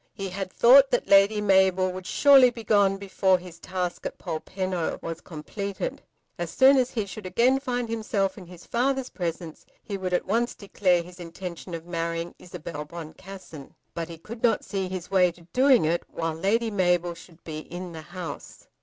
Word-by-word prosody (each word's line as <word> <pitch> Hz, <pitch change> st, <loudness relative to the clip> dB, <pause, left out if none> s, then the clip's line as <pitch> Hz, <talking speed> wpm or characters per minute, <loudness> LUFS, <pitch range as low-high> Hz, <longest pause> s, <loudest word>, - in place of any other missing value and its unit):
He 195 Hz, -1 st, -4 dB
had 185 Hz, 0 st, -5 dB
thought 265 Hz, +3 st, +7 dB
that 245 Hz, -, 0 dB
Lady 200 Hz, +2 st, +5 dB
Mabel 190 Hz, -2 st, +3 dB
would 185 Hz, 0 st, -7 dB
surely 275 Hz, -3 st, +7 dB
be 235 Hz, -2 st, -9 dB
gone 200 Hz, -2 st, +3 dB
before 190 Hz, -1 st, +2 dB
his 175 Hz, -2 st, -12 dB
task 180 Hz, -1 st, -4 dB
at -, -, -5 dB
Polpenno 185 Hz, +1 st, -3 dB
was 165 Hz, 0 st, -6 dB
completed. 195 Hz, +5 st, -5 dB, 0.4 s
As 175 Hz, -1 st, -3 dB
soon 270 Hz, +6 st, +6 dB
as 255 Hz, -1 st, +2 dB
he 220 Hz, -5 st, -2 dB
should 200 Hz, 0 st, -8 dB
again 240 Hz, +8 st, +3 dB
find 245 Hz, -3 st, -2 dB
himself 215 Hz, -4 st, -1 dB
in 185 Hz, -4 st, -11 dB
his 180 Hz, 0 st, -13 dB
father's 260 Hz, +2 st, 0 dB
presence 170 Hz, -3 st, -5 dB, 0.2 s
he 200 Hz, -2 st, -5 dB
would 185 Hz, -1 st, -3 dB
at 180 Hz, -, +1 dB
once 230 Hz, +5 st, 0 dB
declare 185 Hz, -3 st, +1 dB
his 180 Hz, +1 st, -14 dB
intention 175 Hz, 0 st, -7 dB
of 165 Hz, 0 st, -8 dB
marrying 170 Hz, 0 st, -3 dB
Isabel 155 Hz, -3 st, -7 dB
Boncassen. 170 Hz, -1 st, -10 dB, 0.2 s
But 170 Hz, 0 st, -4 dB
he 165 Hz, -, -8 dB
could 225 Hz, +8 st, -10 dB
not 235 Hz, -, +2 dB
see 190 Hz, -2 st, -3 dB
his 185 Hz, 0 st, -6 dB
way 180 Hz, -2 st, +4 dB
to 170 Hz, -1 st, -18 dB
doing 260 Hz, -, +5 dB
it 170 Hz, +2 st, +1 dB
while 165 Hz, -1 st, -3 dB
Lady 220 Hz, +7 st, 0 dB
Mabel 175 Hz, -3 st, +1 dB
should 170 Hz, 0 st, -16 dB
be 155 Hz, -2 st, -6 dB
in 175 Hz, +3 st, -7 dB
the 160 Hz, -1 st, -8 dB
house. 175 Hz, -2 st, -8 dB
185 Hz, 185 wpm, -26 LUFS, 170-210 Hz, 0.4 s, thought